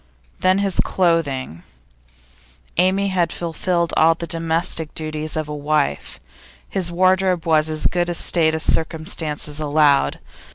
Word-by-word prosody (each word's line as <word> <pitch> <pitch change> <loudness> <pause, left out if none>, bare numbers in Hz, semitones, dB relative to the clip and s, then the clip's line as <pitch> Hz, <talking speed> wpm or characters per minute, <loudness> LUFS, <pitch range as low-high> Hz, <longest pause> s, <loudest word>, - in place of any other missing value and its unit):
Then 185 +1 +3
his 195 -2 +1
clothing. 145 - 0 1.2
Amy 190 +3 +2
had 180 -3 0
fulfilled 170 0 -2
all 165 +1 +4
the 170 - -6
domestic 165 -1 -2
duties 155 0 -4
of 155 -1 -2
a 150 - -5
wife; 145 - -2 0.5
his 180 -3 -1
wardrobe 185 0 +2
was 160 -1 +2
in - - -2
as 155 - -2
good 175 -1 +1
a 175 - -2
state 160 -2 +2
as 160 - -1
circumstances 155 -2 -1
allowed. 145 -2 +2
165 Hz, 135 wpm, -20 LUFS, 155-175 Hz, 1.2 s, all